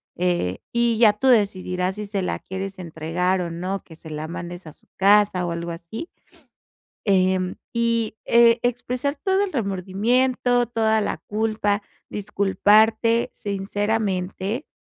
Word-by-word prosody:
eh, 175 - 0
y 235 -1 +1
ya 215 -3 +7
tú 210 +6 -1
decidirás 185 -4 +1
si 210 0 -5
se 200 -1 -2
la 180 - -2
quieres 190 +1 -6
entregar, 175 +2 -1
o 170 - -3
no. 185 +4 -3
Que 160 - -14
se 160 -1 -11
la 155 +1 -4
mandes 175 +1 -7
a 150 - -10
su - - -22
casa, 200 -2 +4
o - - -2
algo 170 0 -4
así. 170 - -7 1.0
Em, 185 -2 +2 0.2
y, 230 -2 0
eh, 235 0 +5
expresar 250 +3 -1
todo 385 +6 +1
el 375 - -8
remordimiento, 240 +4 +1
toda 220 -2 +2
la - - -1
culpa, 210 -1 0 0.3
disculparte 215 +3 +2
sinceramente, 205 - -2
205 Hz, 140 wpm, -23 LUFS, 180-230 Hz, 1.0 s, ya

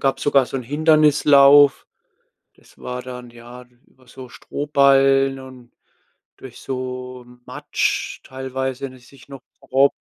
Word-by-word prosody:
gab's 135 0 -1
sogar 140 -2 +2
so - - -6
'n 130 - -5
Hindernislauf, 145 -1 +4 0.7
das - - -25
war 125 0 -6
dann, 125 -1 -10
ja, 120 +1 -13 0.2
über 130 -1 -27
so 125 0 -12
Strohballen 135 -1 +1
und 130 -2 -15 0.6
durch 130 -2 -13
so 125 -1 -7 0.2
Matsch - - -3
teilweise, 130 0 -6
wenn 130 - -10
ich 125 -1 -20
mich 135 -2 -19
noch 135 -2 -11 0.2
grob 135 +1 +1
130 Hz, 130 wpm, -20 LUFS, 125-140 Hz, 0.7 s, Hindernislauf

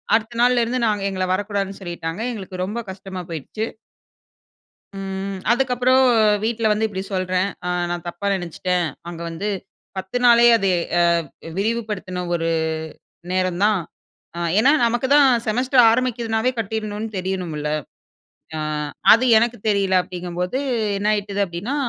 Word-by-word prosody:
அடுத்த 230 +1 -2
நாள்லருந்து 245 0 +3
நாங்க 210 -2 0
எங்கள 185 -1 -2
வரக்கூடாதுன்னு 200 0 -2
சொல்லிட்டாங்க. 170 +1 -5
எங்களுக்கு 185 -3 -5
ரொம்ப 215 +5 -4
கஷ்டமா 190 -1 -7
போயிருச்சு. 215 +8 -4 1.3
ம், 195 0 -4
அதுக்கப்புறம் 255 +1 +3 0.4
வீட்ல 230 0 -1
வந்து 215 +1 +1
இப்டி 190 -2 -5
சொல்றேன், 185 +1 0 0.2
அ - - -1 0.2
"நான் 175 -1 -4
தப்பா 175 +4 -4
நெனச்சுட்டேன் 180 0 -1 0.2
அங்க 170 -1 -8
வந்து 165 +5 -4 0.5
10 240 +4 +4
அது 195 -3 0 0.3
அ - - +5 0.6
விரிவுப்படுத்துன 205 -4 -2
ஒரு 165 -1 0 0.8
நேரம் 185 0 0
தான்." 210 -3 +3 0.6
அ - - -3 0.2
ஏன்னா, 265 +5 +5
நமக்குதான் 260 +4 +4 0.2
செமஸ்டர் 250 +3 +3
ஆரம்பிக்குதுனாவே 235 -1 0
கட்டிடணும்னு 215 0 -3
தெரியணும்ல்ல. 180 -5 -3 0.9
அ - - -3 0.5
அது 230 +3 +3
எனக்கு 240 +1 0
தெரியல, 195 -2 +1
அப்டிங்கும்போது 180 +5 -4 0.4
என்ன 205 +2 0
ஆயிட்டுது 205 -1 -2
அப்டின்னா, 180 +10 -4
200 Hz, 120 wpm, -21 LUFS, 185-235 Hz, 1.3 s, அ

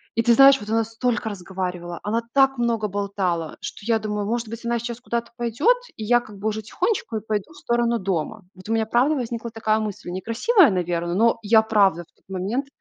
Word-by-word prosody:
и 230 - +3
ты 235 0 +5
знаешь, 275 +2 +7
вот 210 - -9
она 225 +1 +2
столько 225 +1 -2
разговаривала, 180 -3 -5
она 225 +3 0
так 270 -1 +4
много 230 -3 0
болтала, 195 -5 -2
что 200 - -7
я 230 - +3
думаю: 210 -1 -3
"Может 230 -1 -2
быть, 230 +1 -8
она 235 0 +1
сейчас 235 0 -5
куда-то 235 -1 -3
пойдет, 240 - +2 0.2
и 220 - -6
я 240 +3 +4
как 215 -4 -12
бы 205 - -3
уже 220 +1 -3
тихонечко 235 - -2
и 215 - -4
пойду 210 +4 -2
в - - -16
сторону 235 0 +1
дома". 190 +2 -3
Вот 185 +1 -13
у - - +1
меня, 225 -1 +1
правда, 250 +7 +2
возникла 235 -2 -4
такая 220 -1 0
мысль, 210 -4 -5
некрасивая, 235 - +3
наверно, 175 -1 -1
но 230 +2 +3
я, 220 +1 +5
правда, 200 -6 +3
в - - -29
тот - - -36
момент 200 +9 -2
220 Hz, 215 wpm, -23 LUFS, 200-235 Hz, 0.2 s, знаешь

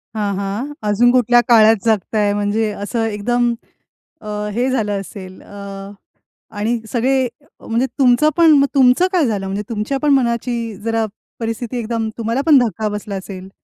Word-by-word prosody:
हां, 205 -2 -1
हां. 205 +9 -4 0.2
अजून 240 +4 +4
कुठल्या 245 -1 +4
काळात 225 -2 +6
जगताय 210 -1 +1
म्हणजे 205 +1 0
असं 210 +3 -3
एकदम 235 +3 0 0.7
अ, 215 - -9 0.3
हे 250 +3 0
झालं 210 -6 -1
असेल 185 -1 -10
अ, - - -18 1.1
आणि 225 +3 0
सगळे 260 +2 +1 0.4
म्हणजे 235 +3 +1
तुमचं 260 +4 +4
पण. 330 -2 +6
मग 280 - +4
तुमचं 265 +6 +4
काय 350 -5 +2
झालं? 205 -5 -2
म्हणजे 195 +2 -3
तुमच्या 230 +5 -2
पण 295 -1 +2
मनाची 235 -3 -1
जरा 225 0 0 0.3
परिस्थिती 230 +1 -4
एकदम 225 -1 -2
तुम्हाला 230 +4 -1
पण 310 -3 +6
धक्का 220 -3 -1
बसला 210 -1 -5
असेल? 190 0 -8
225 Hz, 155 wpm, -18 LUFS, 210-245 Hz, 1.1 s, काळात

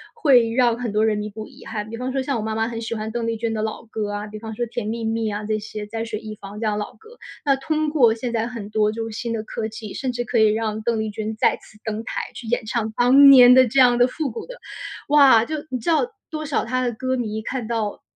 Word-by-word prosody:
会 255 - +4
让 240 -2 +3
很 240 -3 -3
多 215 +1 +2
人 215 -1 +1
弥 210 0 -4
补 215 +1 -8
遗 - - -16
憾。 210 -1 -5
比 230 - -6
方 250 +2 -3
说 270 0 -1
像 260 -1 -1
我 - - -3
妈 220 0 -2
妈 225 0 0
很 230 -1 -5
喜 225 0 -4
欢 215 0 -4
邓 235 0 -2
丽 230 -1 -1
君 225 0 -2
的 215 - -2
老 220 +1 -4
歌 215 -2 -4
啊， 205 +1 -4
比 215 +1 -8
方 220 0 -7
说 240 - -1
甜 235 -2 -5
蜜 230 +1 -3
蜜 225 -1 -1
啊 205 +1 -4
这些， 215 0 -4
在 225 +2 -4
水 220 -2 -4
一 215 -1 -8
方 200 0 -10
这 225 - -2
样 210 -1 0
的 210 - -1
老 - - -10
歌， 450 +2 -17 0.3
那 275 -1 +4
通 310 +2 -1
过 260 -7 +4
现 235 +1 -4
在 225 0 0
很 230 -5 -7
多 215 0 +2
就 225 +1 -4
是 220 - -7
新 235 - -3
的 225 -1 -2
科 220 0 -4
技， 215 -1 -8
甚 265 -3 -2
至 240 0 -3
可 240 0 -1
以 220 - +6
让 220 0 -2
邓 230 0 0
丽 220 - -2
君 215 +1 -4
再 - - +3
次 215 - -19
登 220 0 -3
台， - - -3
去 240 - -8
演 240 0 -1
唱 220 0 -2
当 270 +3 +7
年 250 -2 +9
的 260 0 +7
这 265 +4 +1
样 245 -2 +6
的 245 0 +5
复 295 +2 -3
古 230 - -7
的 - - -10 0.5
哇， 275 -6 +6
就 310 - -3
你 255 - -3
知 225 - -3
道 335 +9 +2 0.2
多 310 -1 -5
少 285 - -1
她 255 +2 -1
的 245 - 0
歌 260 +3 -2
迷 220 -3 -3
看 250 -1 -4
到 220 -1 -2
230 Hz, 310 characters per minute, -22 LUFS, 215-250 Hz, 0.5 s, 年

